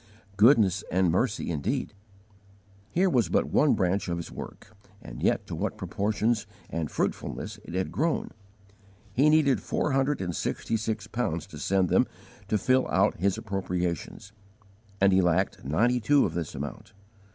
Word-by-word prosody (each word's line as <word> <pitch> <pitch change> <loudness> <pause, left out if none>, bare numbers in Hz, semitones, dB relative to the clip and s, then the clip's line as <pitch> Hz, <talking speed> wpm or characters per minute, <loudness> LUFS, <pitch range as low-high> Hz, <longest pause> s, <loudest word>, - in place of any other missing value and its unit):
Goodness 105 -3 +5
and 90 -1 +3
mercy 105 0 0
indeed! 75 -4 -2 1.0
Here 185 - +2
was 125 - +2
but - - +1
one - - +4
branch 95 +2 0
of 85 - -1
his 85 - -6
work, - - -10 0.2
and - - -10
yet - - +1
to - - -7
what - - -3
proportions 110 +2 -1 0.2
and 80 -3 -2
fruitfulness - - -3
it 85 - -7
had 95 0 -1
grown! 160 +2 -1 0.8
He 140 +7 +4
needed 150 -4 +3
four 150 - -1
hundred 135 +2 +1
and 90 -3 -3
sixty 115 - -2
six 110 -1 -2
pounds 105 -9 -2
to - - -11
send 95 -2 +1
them - - +3 0.4
to 105 - +1
fill 130 +6 +2
out - - +2
his 95 +2 +1
appropriations, 95 -1 -3 0.7
and 100 0 +4
he 95 - +5
lacked 90 +2 +1
ninety 115 - +2
two 140 +5 +4
of 80 - -3
this 85 -3 -4
amount. 70 +8 -7
100 Hz, 160 wpm, -27 LUFS, 90-120 Hz, 1.0 s, Goodness